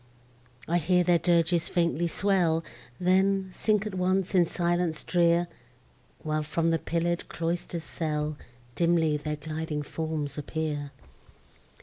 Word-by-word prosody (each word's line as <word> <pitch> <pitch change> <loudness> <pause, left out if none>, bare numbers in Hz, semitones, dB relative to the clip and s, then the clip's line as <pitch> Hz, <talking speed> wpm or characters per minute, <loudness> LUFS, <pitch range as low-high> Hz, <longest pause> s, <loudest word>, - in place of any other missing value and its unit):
I 175 +2 +2
hear 180 +2 +3
their 175 -1 +3
dirges 170 0 +2
faintly 170 -1 +1
swell! 170 -3 +1 0.4
Then, 190 +1 +2
sink 215 0 +1
at 210 - -4
once 185 +1 0
in 175 -3 +4
silence 175 -2 0
drear, 170 -1 +3 0.8
While, 155 0 0
from 165 +2 0
the 165 - +1
pillar'd 170 +1 -1
cloister's 170 0 -3
cell, 150 -2 -2 0.4
Dimly 165 -3 +2
their 150 +1 -3
gliding 155 0 -4
forms 150 -1 -4
appear! 150 -1 -3
170 Hz, 120 wpm, -28 LUFS, 155-180 Hz, 0.8 s, in